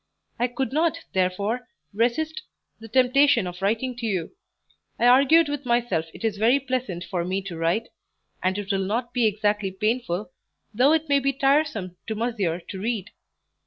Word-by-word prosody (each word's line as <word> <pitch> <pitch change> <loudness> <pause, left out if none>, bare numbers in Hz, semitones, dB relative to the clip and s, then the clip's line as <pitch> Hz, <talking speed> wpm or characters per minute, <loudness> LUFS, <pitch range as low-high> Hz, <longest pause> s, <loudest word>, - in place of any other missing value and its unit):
I 245 - +2
could 255 +2 -3
not, 335 +2 +1
therefore, 200 +6 0 0.3
resist 310 - 0 0.4
the 225 - -10
temptation 260 +1 +4
of 180 0 -7
writing 230 +6 0
to 235 -2 -3
you; 190 - -3 0.6
I 235 - +1
argued 280 +6 +6
with 290 -1 -3
myself 235 -9 0
it - - -12
is 215 -2 0
very 240 +6 +4
pleasant 255 -10 -3
for 180 -2 -3
me 190 +2 -2
to 185 -3 -6
write, 170 +8 0 0.5
and 185 +1 0
it 205 -1 -3
will 195 -1 0
not 235 +5 -2
be 240 -3 +3
exactly 210 -1 0
painful, 210 -1 -2 0.4
though 255 +7 +4
it 320 0 +1
may 280 -1 +4
be 275 0 0
tiresome 270 - +1
to 220 - -2
monsieur 210 -7 -1
to 190 - -6
read. 220 -2 -2
230 Hz, 170 wpm, -24 LUFS, 195-260 Hz, 0.6 s, argued